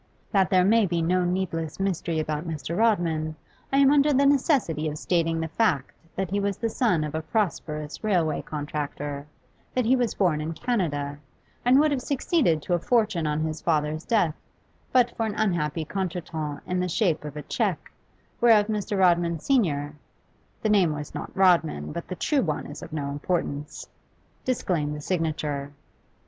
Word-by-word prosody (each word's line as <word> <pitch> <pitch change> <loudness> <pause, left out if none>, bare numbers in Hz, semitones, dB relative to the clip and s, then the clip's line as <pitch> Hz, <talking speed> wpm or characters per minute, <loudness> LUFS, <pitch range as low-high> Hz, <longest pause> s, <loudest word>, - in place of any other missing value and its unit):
That 195 -3 +3
there 185 -1 +4
may 220 +1 +4
be 170 -1 0
no 180 +2 +2
needless 175 -3 -2
mystery 180 -4 -1
about 155 +1 -2
Mr. 155 0 -4
Rodman, 170 -8 +1 0.4
I 270 - +2
am 275 0 +6
under 290 0 +4
the 280 0 +4
necessity 265 - +2
of 150 - -5
stating 165 0 0
the 160 - -2
fact 160 - +1 0.2
that 190 -2 -2
he 200 - +1
was 200 0 -1
the 230 -1 -2
son 210 - +2
of 150 -1 -4
a 160 - -1
prosperous 155 -6 -2
railway 175 -8 +1
contractor, 145 -1 -5 0.5
that 255 -2 +2
he 250 +4 +4
was 245 -3 0
born 170 -6 +2
in 160 +2 -3
Canada, 150 - -2 0.4
and 250 +3 +5
would 305 0 +4
have 275 -3 0
succeeded 260 - +1
to 180 - -1
a 175 - +3
fortune 210 -4 +1
on 150 +1 0
his 155 0 -3
father's 155 -1 0
death, 185 -9 +2 0.6
but 245 -2 +3
for 225 -1 -1
an 210 - -4
unhappy 170 -6 0
contretemps 165 -5 -4
in 180 0 -1
the 180 0 -1
shape 170 -4 +1
of 150 0 -7
a 150 - -5
cheque, - - -2 0.5
whereof 225 -3 +6
Mr. 210 -1 -2
Rodman 175 -2 +3
senior 150 - +1 0.7
(the 215 - +2
name 190 -7 +4
was 150 -1 -6
not - - -5
Rodman, 165 - +3
but 170 - -6
the 185 - -5
true 285 - +1
one 155 -8 -2
is 145 - -8
of - - -9
no 145 -2 -3
importance) 145 -1 -3 0.6
disclaimed 170 -12 0
the 150 - -7
signature. 150 -4 -2
170 Hz, 175 wpm, -26 LUFS, 150-210 Hz, 0.7 s, am